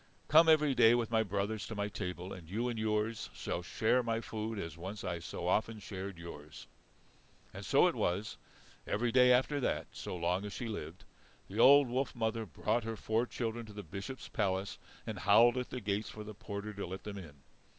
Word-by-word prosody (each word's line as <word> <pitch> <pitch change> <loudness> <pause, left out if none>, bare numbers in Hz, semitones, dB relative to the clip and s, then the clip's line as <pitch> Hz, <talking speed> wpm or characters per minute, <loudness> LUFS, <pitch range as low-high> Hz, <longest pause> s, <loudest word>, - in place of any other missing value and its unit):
Come 160 +2 +7
every 150 -3 +5
day 115 -2 +6
with 120 -2 -1
my 110 -1 +4
brothers 100 0 -2
to 110 - -6
my 100 0 -1
table, 90 -2 -5
and 85 -4 -11
you 115 +6 -1
and 115 -2 -3
yours 110 +1 -1
shall 85 - -3
share 110 +7 +2
my 115 -1 -1
food, 110 -1 -4
as 80 -6 -5
once 95 +5 -7
I 85 -2 -2
so 85 +1 -5
often 110 +4 +1
shared 100 -2 -6
yours." 75 -3 -10 0.9
And - - -7
so - - +4
it - - +3
was. 100 +4 -1 0.5
Every 120 +3 0
day 125 0 +6
after 130 +4 +3
that, 130 - -1
so - - -6
long 90 +3 0
as 105 -1 -6
she 120 - -4
lived, 90 -5 -6 0.4
the 100 +4 -6
old 140 +2 +8
wolf 130 +2 -1
mother 110 -1 -1
brought 105 - -1
her 115 0 -3
four 115 +4 0
children 115 -1 -3
to 105 - -11
the 105 0 -7
Bishop's 100 - -7
palace 95 -1 -1 0.3
and - - -5
howled 115 +4 +6
at 125 -1 -3
the 125 - -4
gate 100 -1 -1
for 105 - -8
the 105 0 -8
porter 100 +1 -6
to 100 -2 -5
let 95 +2 -7
them 100 -1 -6
in. 80 -6 -11
105 Hz, 205 wpm, -33 LUFS, 95-115 Hz, 0.9 s, old